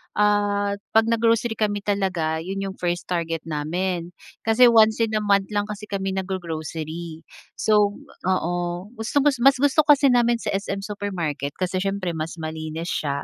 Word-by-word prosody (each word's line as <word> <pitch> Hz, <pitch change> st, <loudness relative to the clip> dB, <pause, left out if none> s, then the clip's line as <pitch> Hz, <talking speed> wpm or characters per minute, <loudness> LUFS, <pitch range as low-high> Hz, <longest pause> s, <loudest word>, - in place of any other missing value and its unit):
ah, 205 Hz, -1 st, +2 dB, 0.2 s
'pag 225 Hz, 0 st, +4 dB
nag-grocery 230 Hz, 0 st, +2 dB
kami 205 Hz, -1 st, 0 dB
talaga, 185 Hz, -6 st, -1 dB
yun 195 Hz, +3 st, -4 dB
yung 195 Hz, -1 st, -5 dB
first 175 Hz, 0 st, -2 dB
target 165 Hz, -2 st, -2 dB
namin. 170 Hz, +3 st, -2 dB, 0.3 s
Kasi 225 Hz, +3 st, +6 dB
once 220 Hz, -1 st, +5 dB
in 225 Hz, -1 st, +1 dB
a 215 Hz, -, 0 dB
month 200 Hz, -1 st, +2 dB
lang 205 Hz, -1 st, +1 dB
kasi 210 Hz, 0 st, -7 dB
kami 195 Hz, -1 st, -2 dB
nag-go-grocery. 165 Hz, -3 st, -5 dB, 0.3 s
So, 210 Hz, -1 st, +3 dB, 0.3 s
oo, 175 Hz, -2 st, +1 dB, 0.4 s
gustong 250 Hz, +4 st, 0 dB, 0.2 s
mas 270 Hz, +3 st, +6 dB
gusto 285 Hz, +3 st, +2 dB
kasi 285 Hz, -2 st, +6 dB
namin 240 Hz, -1 st, +3 dB
sa 230 Hz, -, -3 dB
SM 195 Hz, 0 st, -3 dB
Supermarket, 175 Hz, -9 st, -4 dB
kasi 185 Hz, 0 st, -1 dB
siyempre 195 Hz, -1 st, -2 dB
mas 160 Hz, 0 st, -4 dB
malinis 160 Hz, +1 st, -5 dB
siya. 140 Hz, -1 st, -2 dB
195 Hz, 155 wpm, -23 LUFS, 170-215 Hz, 0.4 s, Kasi